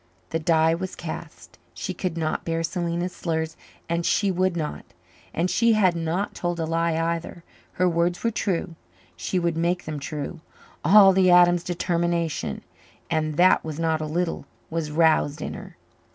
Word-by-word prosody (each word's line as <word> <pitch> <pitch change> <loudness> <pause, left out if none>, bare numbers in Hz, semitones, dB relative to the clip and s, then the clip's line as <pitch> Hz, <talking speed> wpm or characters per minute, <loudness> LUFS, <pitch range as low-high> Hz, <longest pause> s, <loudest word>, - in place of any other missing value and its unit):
The 165 - 0
die 160 0 +3
was 185 +3 -4
cast; - - -8 0.2
she - - -4
could 180 -3 -3
not 155 -1 -1
bear 165 0 -1
Selena's 175 +1 -2
slurs 160 -1 -2 0.3
and 170 +1 -1
she 200 +3 +2
would 185 -1 0
not. 150 - -4 0.5
And 170 +3 0
she 230 +4 +3
had 190 -5 +3
not 170 +4 -2
told 175 -1 -3
a 165 - 0
lie 165 0 0
either. 170 +1 -3 0.3
Her 185 - +2
words 175 +1 0
were 230 - +2
true; 190 -5 -2 0.4
she 85 - -2
would 170 -2 0
make 175 +2 0
them 155 -2 -4
true. 150 +3 -5 0.4
All 195 +1 +8
the 185 -1 +4
Adams 175 -1 +6
determination 170 -2 -1 0.5
and 155 -1 0
that 180 +1 +5
was 155 -2 -5
not 160 -1 0
a 155 - -3
little 170 +2 -2 0.2
was 160 -2 -2
roused 155 -1 +2
in - - -4
her. - - -10
170 Hz, 165 wpm, -24 LUFS, 160-180 Hz, 0.5 s, All